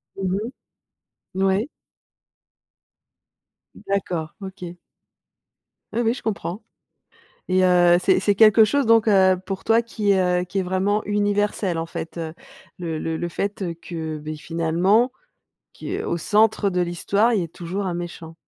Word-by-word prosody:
Mmh 190 -1 -1
mh. 220 +5 -3 0.9
N 190 - 0
ouais. 200 +8 +1 2.1
D'accord, 180 -5 -3
OK. 185 -2 -8 1.2
Oui, 235 - -1
oui, 230 0 +2
je - - -9
comprends 210 -1 -4 0.9
et 185 0 +3
heu, 175 -1 +5
c'est - - +4
c'est 205 -1 +1
quelque 220 0 +7
chose 280 +4 +1
donc 225 0 +4
heu, 190 -2 +5
pour 195 -1 -5
toi 225 +1 +4
qui, 210 -3 0
heu 180 -1 +2
qui 195 +2 -3
est - - +1
vraiment 190 +3 0
universel, 205 -3 0
en 165 - -2
fait. 165 0 -7 0.6
Le 165 -3 -4
le 160 0 -3
le 175 +1 -3
fait, 200 +3 -3
heu, 170 -2 -3
que, 160 -2 -6
beh, 155 +1 -6
finalement, 170 +9 +1 0.6
qui - - -5
au - - -2
centre 210 +3 +2
de 180 -1 -1
l'histoire, 200 +6 +1
il 200 - +1
y - - -1
ait - - -5
toujours 180 +4 -5
un 180 - -2
méchant. 170 -2 -7
190 Hz, 155 wpm, -22 LUFS, 175-210 Hz, 2.1 s, quelque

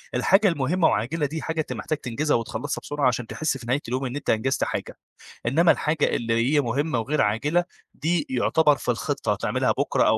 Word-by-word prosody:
الحاجة 195 - +4
المهمة 165 +1 +2
وعاجلة 145 +9 0
دي 155 +3 -4
حاجة 160 0 -3
أنت - - -5
محتاج 155 - -3
تنجزها 145 +4 -1
وتخلصها 115 +4 -4
بسرعة، 145 -2 0
عشان 125 -2 -1
تحس 155 0 -2
في 120 - -11
نهاية 135 +4 +1
اليوم 130 +3 -2
إن 125 +1 -4
أنت 145 - -5
أنجزت 130 +4 +1
حاجة، - - -4 0.5
إنما 165 +8 +4
الحاجة 155 0 +1
اللي 115 -1 -1 0.2
هي 145 - +5
مهمة 135 +2 -1
وغير 140 +7 0
عاجلة 120 +12 +1 0.3
دي 160 -1 -1
يُعتبر 150 +4 +3
في - - -1
الخطة - - -1
هتعملها - - 0
بكرة - - +1
أو - - +4
145 Hz, 195 wpm, -24 LUFS, 125-155 Hz, 0.5 s, هي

